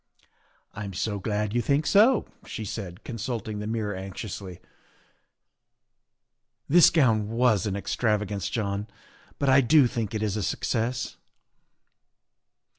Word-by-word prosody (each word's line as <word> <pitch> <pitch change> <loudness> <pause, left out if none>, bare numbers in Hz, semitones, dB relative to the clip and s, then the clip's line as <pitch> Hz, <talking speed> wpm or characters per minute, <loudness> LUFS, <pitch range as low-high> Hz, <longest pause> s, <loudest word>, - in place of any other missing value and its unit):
" - - -37 0.3
I'm 100 -2 -6
so 105 +3 -2
glad 105 +1 -2
you 120 - +2
think 140 +6 +1
so," 220 +4 +5 0.2
she 110 - -5
said, 95 -4 -6
consulting 115 -2 -4
the 105 - -4
mirror 110 -2 -2
anxiously. 95 -1 -7 1.4
" - - -56
This 170 +4 +7
gown 115 -9 +2
was 115 -4 +2
an 100 - -2
extravagance, 105 -2 -1
John, 100 -2 -2 0.5
but 140 - -1
I 135 +1 +6
do 140 +2 +5
think 115 -3 -2
it 110 - -1
is 105 -2 -1
a 105 - -2
success. 115 +6 -2
110 Hz, 130 wpm, -26 LUFS, 100-120 Hz, 1.4 s, This